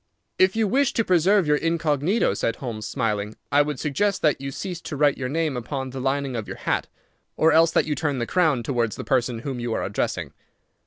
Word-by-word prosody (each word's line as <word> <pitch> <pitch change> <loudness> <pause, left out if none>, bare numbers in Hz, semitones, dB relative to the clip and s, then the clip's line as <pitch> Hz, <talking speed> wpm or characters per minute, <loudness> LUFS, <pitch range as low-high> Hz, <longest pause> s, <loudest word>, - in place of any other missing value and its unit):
"If 185 +2 +4
you 220 -1 +2
wish 270 +5 +2
to 230 - +1
preserve 185 +2 +3
your 150 0 +3
incognito," 165 - +1
said 115 +3 -1
Holmes, 110 -4 -5
smiling, 110 -4 -2 0.2
"I 145 +2 +5
would 145 -3 -2
suggest 190 +7 0
that 150 -4 +2
you 135 - -4
cease 175 +4 -5
to - - -6
write 145 0 +3
your 125 -2 -4
name 155 -1 -1
upon 130 +2 -4
the 130 - -6
lining 135 0 -1
of 110 -3 -4
your - - -7
hat, - - -1 0.5
or 160 +1 +4
else 165 +1 +5
that - - +2
you 155 - -1
turn 145 -3 -1
the 120 - -1
crown 155 -8 +2
towards 115 -3 -1
the - - -6
person 125 -2 0
whom 135 -3 -3
you 120 -1 -2
are - - -1
addressing. - - -2
145 Hz, 220 wpm, -24 LUFS, 125-165 Hz, 0.5 s, I